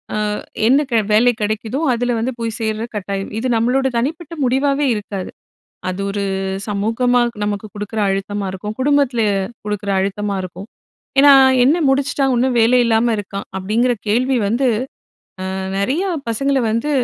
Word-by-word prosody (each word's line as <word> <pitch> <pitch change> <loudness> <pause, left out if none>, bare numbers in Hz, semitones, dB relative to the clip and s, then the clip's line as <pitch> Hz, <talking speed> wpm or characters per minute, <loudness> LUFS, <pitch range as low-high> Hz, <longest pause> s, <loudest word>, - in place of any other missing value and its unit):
அ - - -1 0.5
என்ன 270 +4 +5
க - - -2 0.2
வேலை 230 +4 +5
கெடைக்குதோ 215 +4 -2
அதில 245 +1 0
வந்து 240 +3 -1
போய் 230 -1 -3
சேர்ற 220 0 -2
கட்டாயம். 195 -1 -3
இது 235 +3 -1
நம்பளோட 250 +4 +2
தனிப்பட்ட 310 +7 -3
முடிவாவே 275 +3 +1
இருக்காது. 205 -3 -5 0.6
அது 185 +1 -5
ஒரு 200 0 -2 0.4
சமூகமா 225 +5 +1 0.2
நமக்கு 205 0 -3
குடுக்குற 210 +1 -5
அழுத்தமா 195 +1 -2
இருக்கும். 210 +3 -6
குடும்பத்தில 275 -3 +2 0.4
குடுக்குற 205 -1 -2
அழுத்தமா 200 +1 -2
இருக்கும். 185 +2 -8 0.5
ஏன்னா, 285 +1 +8 0.3
"என்ன 285 +7 +4
முடிச்சுட்டான், 275 0 +1
இன்னும் 250 +1 +1
வேலை 235 +3 +4
இல்லாம 230 +1 +2
இருக்கான்?" 200 0 -5
அப்படிங்கிற 220 +6 +1
கேள்வி 250 +5 +2
வந்து 240 +6 +1 0.9
அ - - -4 0.2
நெறைய 265 - 0 0.3
பசங்களை 275 +3 +1
வந்து, 230 +7 -1
230 Hz, 140 wpm, -18 LUFS, 205-260 Hz, 0.9 s, ஏன்னா